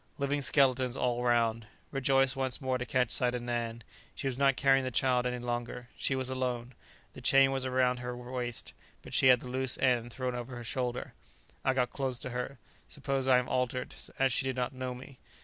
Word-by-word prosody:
Living 140 0 0
skeletons 130 -2 +3
all 120 0 0
round. 115 -2 +1 0.2
Rejoiced 135 0 +3
once 130 -2 -1
more 130 -2 -1
to 125 - -4
catch 125 -3 +1
sight 125 0 +2
of 120 - -4
Nan. 120 -1 -3 0.3
She - - -6
was 135 -2 -1
not 135 0 +3
carrying 135 -1 +4
the 130 - -1
child 125 0 +2
any 125 0 -2
longer; 120 0 -4
she 135 - 0
was 130 -1 -1
alone; 125 -1 -3 0.4
the - - -10
chain 135 0 +5
was 135 -1 -1
round 125 -1 +2
her 125 0 -5
waist, 125 -1 -5 0.3
but - - -11
she - - +4
had 125 -2 +6
the - - -8
loose 130 0 +3
end 120 -2 +1
thrown 130 +1 -3
over 125 +1 -6
her 120 - -7
shoulder. 125 +1 -3 0.5
I 130 - +2
got 125 -1 0
close 135 -3 -2
to 125 - -6
her; 125 +3 -4 0.3
suppose 135 -2 -2
I 130 -1 +6
am 125 - 0
altered, 125 0 -1 0.2
as 135 -1 +2
she - - +1
did 130 -1 -2
not 125 +1 -2
know 130 -1 -4
me. 125 +1 -12
125 Hz, 210 wpm, -31 LUFS, 125-130 Hz, 0.5 s, had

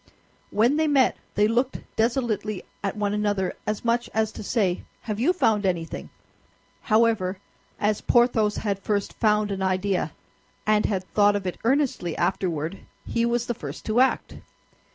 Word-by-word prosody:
When 235 +8 +3
they 315 0 +2
met 275 -3 +4 0.2
they 210 +1 +4
looked 245 +4 0 0.2
desolately 225 -4 0 0.2
at 200 +1 -2
one 205 -1 0
another, 205 -3 0
as 215 +2 -2
much 235 +1 +1
as 220 -1 +1
to - - -8
say, 200 -4 0 0.2
"Have 215 -2 -4
you 280 +10 +4
found 220 - +2
anything?" 175 -4 -2 0.7
However, 215 -4 +2 0.4
as 210 0 +1
Porthos 235 -3 +3
had 200 -3 -1
first 200 0 -1
found 210 -2 +2
an 195 -1 -3
idea, 185 -3 0 0.5
and 215 0 +3
had 190 -3 -1
thought 205 +2 +3
of 200 -2 -2
it 180 - -3
earnestly 250 - +1
afterward, 170 -1 -1 0.3
he 235 0 0
was 240 0 0
the 240 - -1
first 145 -7 -8
to 220 +2 +1
act. 260 +1 +2
210 Hz, 155 wpm, -25 LUFS, 195-235 Hz, 0.7 s, met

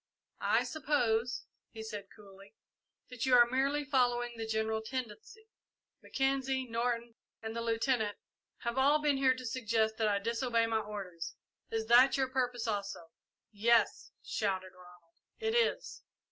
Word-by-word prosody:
"I 225 +3 +4
suppose," 245 -4 0 0.2
he 220 -1 -8
said 210 -3 -7
coolly, 200 0 -16 0.5
"that 250 0 -3
you 255 - +6
are 240 -1 +8
merely 275 +4 0
following 245 -3 +1
the 225 -1 -5
general 220 0 -1
tendency. 260 - -7 0.5
Mackenzie, 270 -1 0
Norton, 235 0 -2 0.3
and 220 0 -6
the 230 - -2
Lieutenant 225 -2 0 0.4
have 235 +2 -1
all 285 +3 +5
been 295 -2 +2
here 260 -1 +3
to 255 0 -8
suggest 225 -2 0
that 220 - +1
I 205 -1 +2
disobey 230 +2 0
my 225 -1 0
orders. 195 -6 -6 0.3
Is 225 0 -2
that 245 +5 +6
your 265 -1 +1
purpose, 250 -2 -1
also?" 200 -5 -4 0.4
"Yes," 225 +2 +2
shouted 190 -3 -2
Ronald, 180 -2 -18 0.3
"it 445 -1 -1
is!" 475 -1 0
230 Hz, 145 wpm, -32 LUFS, 220-260 Hz, 0.5 s, are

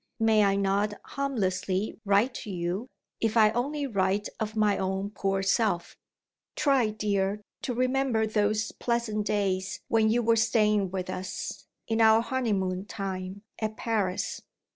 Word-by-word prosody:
May 220 -1 +4
I 195 -1 +3
not 200 +1 +1
harmlessly 200 -8 -1
write 205 +6 +3
to - - -8
you, 180 +5 -3 0.3
if 225 0 0
I 215 -1 +6
only 280 +5 -1
write 200 -3 0
of 220 -1 -3
my 210 -2 +3
own 190 +1 -2
poor 195 -2 -1
self? 195 -3 +1 0.6
Try, 275 -6 +3
dear, 205 -1 -1 0.2
to 250 - -3
remember 255 -2 +1
those 215 0 0
pleasant 230 -3 -1
days 190 -2 -1
when 220 -1 +3
you 240 +2 +2
were 230 0 +4
staying 215 -3 +2
with 185 0 -4
us, 185 0 -5 0.2
in 225 0 +1
our 220 0 +6
honeymoon 200 -7 -1
time, 195 -1 -5 0.2
at 215 -1 -3
Paris. 205 -5 -1
210 Hz, 140 wpm, -28 LUFS, 195-225 Hz, 0.6 s, I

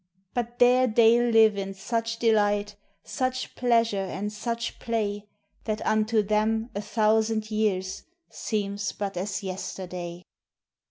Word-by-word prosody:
But 240 0 -3
there 250 +1 +5
they 230 +1 +5
live 225 -3 +4
in 195 0 -5
such 230 +3 -2
delight, 205 -2 +2 0.3
Such 255 0 -3
pleasure 230 -4 +2
and 195 +2 -4
such 230 +2 -4
play, 210 -3 -2 0.4
That 215 -1 -3
unto 215 0 +2
them 220 +3 0
a 205 - -3
thousand 220 0 +1
years 195 -3 -1 0.3
Seems 205 -1 -3
but 200 -2 -4
as 190 +2 -3
yesterday. 180 -2 -6
215 Hz, 120 wpm, -26 LUFS, 200-230 Hz, 0.4 s, there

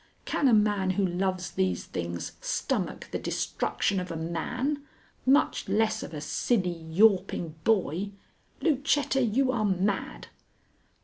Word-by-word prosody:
Can 280 - +1
a 245 - +5
man 205 -3 +2
who 200 - +3
loves 185 0 -1
these 95 - 0
things 85 0 -4
stomach - - -2
the - - -2
destruction 195 -1 -1
of 180 0 -5
a 165 - -4
man, 245 - -2 0.4
much 275 +3 +3
less 220 0 +2
of - - -7
a 150 -2 -6
silly, 185 +1 0 0.2
yawping 185 -3 +3
boy? 195 -2 +1 0.5
Lucetta, 285 -3 +2
you 255 +3 +2
are 235 -4 0
mad!" 190 - -1
195 Hz, 130 wpm, -28 LUFS, 170-235 Hz, 0.5 s, a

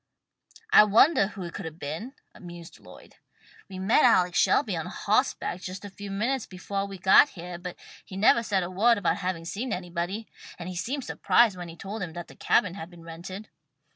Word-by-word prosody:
"I - - +10
wondah 215 0 +4
who 195 - -7
it 170 - -7
could 195 - -6
have 160 0 -7
been," 170 - -6 0.2
mused 175 -2 -11
Lloyd. - - -16 0.5
"We 190 - -8
met 195 +10 +3
Alex 180 -7 +4
Shelby - - +2
on - - -4
hawseback 180 - -1
just 190 +2 -7
a 200 - -8
few 200 +1 -9
minutes 235 +6 -1
befoah 195 +2 -4
we 195 - -8
got 190 +10 +6
heah, 175 +1 -7
but 180 0 -7 0.3
he 190 - -9
nevah 220 +3 +5
said 195 -4 0
a 175 - -5
word 225 +5 +3
about 200 - 0
having 180 -4 -3
seen 220 +8 -4
anybody, 180 +3 -4 0.3
and 170 - -7
he 185 - -6
seemed 260 +9 -3
surprised 235 -4 +3
when 175 -1 -7
we 165 - -10
told 200 +5 -7
him 175 -3 -5
that 175 0 -8
the - - -14
cabin 180 -4 +2
had 175 -3 -8
been 175 -2 -15
rented." 175 +5 -9
190 Hz, 200 wpm, -27 LUFS, 175-210 Hz, 0.5 s, I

